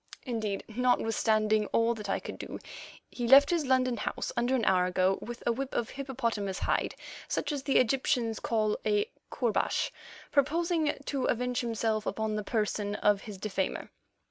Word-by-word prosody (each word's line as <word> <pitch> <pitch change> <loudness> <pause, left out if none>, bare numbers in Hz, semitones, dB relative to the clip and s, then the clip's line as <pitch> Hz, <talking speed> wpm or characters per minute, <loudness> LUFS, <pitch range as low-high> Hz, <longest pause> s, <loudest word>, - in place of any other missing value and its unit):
Indeed, 220 -6 -2
notwithstanding 220 -2 +2
all 230 +1 +2
that 210 -3 -7
I - - +1
could - - -8
do, - - -6 0.5
he 240 -1 -3
left 280 +4 +8
his 330 -5 +1
London 255 -2 +2
house - - -3
under 245 +2 +1
an 235 -4 0
hour 185 -1 +4
ago 185 +1 +2
with 240 0 -7
a 235 - +3
whip 265 +3 -4
of 230 - -1
hippopotamus 230 -8 -2
hide - - 0 0.3
such - - -1
as 290 -2 -2
the 275 0 +2
Egyptians 240 -2 +1
call 215 -2 0
a 210 -1 +1 0.2
koorbash, 245 - 0 0.4
purposing 320 +2 +1
to 270 -3 -1
avenge 250 +1 0
himself 225 -2 -1
upon 220 -1 -1
the 210 - -2
person 210 -1 -1
of 205 -1 +2
his 210 -3 -8
defamer. 190 -1 -3
230 Hz, 165 wpm, -30 LUFS, 210-255 Hz, 0.5 s, left